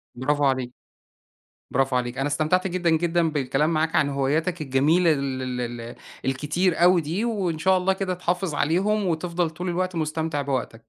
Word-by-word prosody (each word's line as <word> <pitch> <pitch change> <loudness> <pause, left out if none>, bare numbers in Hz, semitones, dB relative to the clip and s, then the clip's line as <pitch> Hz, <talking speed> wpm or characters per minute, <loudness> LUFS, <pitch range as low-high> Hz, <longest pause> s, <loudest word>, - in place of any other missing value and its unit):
براڤو 145 +3 0
عليك، 130 -2 0 1.0
براڤو 135 0 +1
عليك، 125 +1 -2
أنا 135 - 0
استمتعت 155 +6 +1
جدًا، 175 -2 0
جدًا 165 +1 +2
بالكلام 145 +2 0
معاك 160 +1 0
عن 145 - +3
هواياتَك 150 +6 0
الجميلة 155 +5 +3
ال 135 -2 -2 0.2
ال 120 -1 -4
ال 115 +1 -8 0.3
الكتير 150 +7 0
أوي 180 0 +6
دي، 165 +8 -2
وإن 190 -9 -1
شاء 190 +3 +3
الله 190 +1 +1
كده 190 -1 -2
تحافظ 180 -1 -2
عليهم، 195 +8 +1
وتفضل 170 0 -1
طول 180 +3 -5
الوقت 180 0 -2
مُستمتع 155 -1 -1
بوقتَك. 130 -4 -3
160 Hz, 165 wpm, -24 LUFS, 135-180 Hz, 1.0 s, أوي